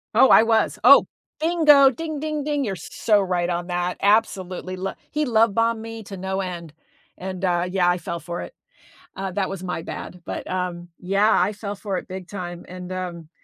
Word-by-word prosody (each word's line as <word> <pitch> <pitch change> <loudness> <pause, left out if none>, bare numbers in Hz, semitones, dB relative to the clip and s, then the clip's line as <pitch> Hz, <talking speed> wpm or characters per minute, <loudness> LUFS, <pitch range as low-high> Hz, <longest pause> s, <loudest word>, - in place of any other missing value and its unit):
Oh, 260 +3 +7
I 220 - +8
was, 225 -1 +2
oh, - - +8 0.3
bingo, 305 -4 +6
ding 310 +2 -5
ding 305 -1 -3
ding, 290 -1 -1
you're 200 -6 -2
so 210 +3 +1
right 180 -3 0
on 175 0 -2
that. 180 0 -2
Absolutely, 190 -3 +1
lo 190 +1 -4 0.2
he 300 +1 -1
love 225 -4 +3
bombed 230 -1 +1
me 225 -1 -7
to 195 -1 -9
no 190 +1 -3
end, 175 -4 -5 0.5
and, 190 0 -6
uh, 175 -1 +1
yeah, 180 -1 +2
I 175 - +2
fell 170 -1 -5
for 170 +2 -5
it, - - -8 0.6
uh, 190 -1 -4
that 190 0 0
was 195 -1 -6
my 180 -3 -4
bad, 180 +1 -7
but, - - -5
um, 180 -1 -3
yeah, 195 +4 +2
I 185 +4 +2
fell 205 0 -5
for 195 -1 -3
it - - -6
big 185 -1 -7
time, 175 -3 -7
and, 180 0 -8
um, 175 -4 -5
190 Hz, 200 wpm, -23 LUFS, 180-225 Hz, 0.6 s, I